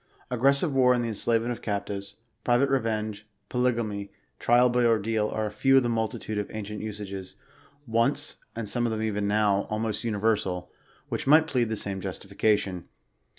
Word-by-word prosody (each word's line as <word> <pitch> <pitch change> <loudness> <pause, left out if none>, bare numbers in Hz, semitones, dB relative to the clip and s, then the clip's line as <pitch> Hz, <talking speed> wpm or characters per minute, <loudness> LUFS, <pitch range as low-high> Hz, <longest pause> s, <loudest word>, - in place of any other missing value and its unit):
Aggres 135 +3 +4
sive 145 +1 +1
war 125 -1 +5
and 120 - 0
the 115 - -1
enslavement 115 +2 0
of 120 - -5
captives, 100 -1 -4 0.3
private 125 +3 +3
revenge, 110 -4 -1 0.2
po 125 - -2
lygamy, 115 -5 0 0.3
trial 120 +1 +5
by 125 0 +2
ordeal, 110 -2 +2
are 110 - -2
a 105 - -3
few 135 +6 +4
of 135 - +5
the 120 - 0
multitude 110 -2 -2
of 105 - -4
ancient 105 -1 -5
usages, 100 -3 -6 0.5
once 115 -1 0
— - - -42
and 115 -2 -4
some 120 +3 0
of - - -1
them 110 0 -2
even 105 -2 -1
now 100 -1 +2
— - - -23
almost 110 0 -2
universal, 105 -5 0 0.4
which - - -3
might 155 +3 +7
plead 125 -7 0
the 110 - -1
same 100 -2 -3
justification. 100 -1 -1
110 Hz, 185 wpm, -27 LUFS, 105-120 Hz, 0.5 s, might